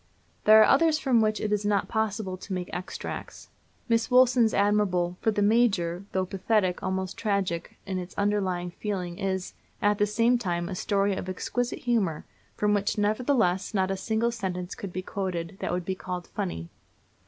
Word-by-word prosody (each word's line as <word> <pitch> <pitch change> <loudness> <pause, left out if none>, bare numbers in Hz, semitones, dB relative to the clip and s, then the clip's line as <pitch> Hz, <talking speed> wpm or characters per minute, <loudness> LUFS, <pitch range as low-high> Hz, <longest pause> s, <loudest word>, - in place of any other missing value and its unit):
There 215 +1 +9
are - - +8
others 310 +2 +4
from 255 -6 +3
which 215 0 +1
it 210 - -2
is 210 0 0
not 205 -1 +1
possible 215 -3 -1
to 190 +1 -7
make 180 -1 -4
extracts. 180 +1 -6 0.4
Miss 230 -1 +1
Woolson's 250 -2 +5
admirable 200 -4 +2
"For - - +2
the 205 -1 +1
Major," 200 -5 +2
though 190 0 0
pathetic, 190 0 0
almost 190 0 -3
tragic, 200 -6 -1
in 190 -2 -2
its 180 0 -8
underlying 190 -4 0
feeling, 180 -2 -4
is, 190 -2 -2 0.3
at 205 0 +2
the 210 - +3
same 230 +3 +2
time, 175 -5 -2
a - - -4
story 200 +1 +1
of 185 - -5
exquisite 245 +6 -2
humor, 210 -10 0 0.3
from 210 0 +2
which, 205 +1 0
nevertheless, 215 -3 +1
not 190 -1 +1
a - - 0
single 220 +4 0
sentence 185 -5 -4
could 195 - -7
be 185 +1 -4
quoted 185 -2 -4
that - - -2
would 180 -1 -2
be 190 - -1
called 180 -1 -5
"funny." 130 - -4
200 Hz, 175 wpm, -27 LUFS, 185-220 Hz, 0.4 s, There